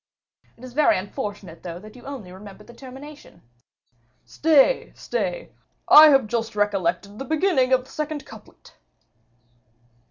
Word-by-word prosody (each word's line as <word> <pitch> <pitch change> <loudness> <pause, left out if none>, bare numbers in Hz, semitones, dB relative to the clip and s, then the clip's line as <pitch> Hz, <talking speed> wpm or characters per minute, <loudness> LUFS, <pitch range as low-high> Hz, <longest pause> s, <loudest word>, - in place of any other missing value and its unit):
"It 235 - -18
is 255 -1 -10
very 300 +2 +3
unfortunate, 195 -2 -7
though, 170 -1 -7
that 215 +5 -13
you 250 - -13
only 250 -10 -8
remember 200 +2 -12
the 240 - -15
termination." 275 +4 -13 0.8
"Stay, 315 - +2
stay, - - -4 0.4
I 310 +1 +10
have 270 -5 +4
just 225 0 -3
recollected 200 -1 -1
the - - -4
beginning 315 -5 +1
of 255 -1 +3
the - - -18
second 305 -2 -5
couplet." 220 -1 -16
250 Hz, 135 wpm, -23 LUFS, 205-290 Hz, 0.8 s, I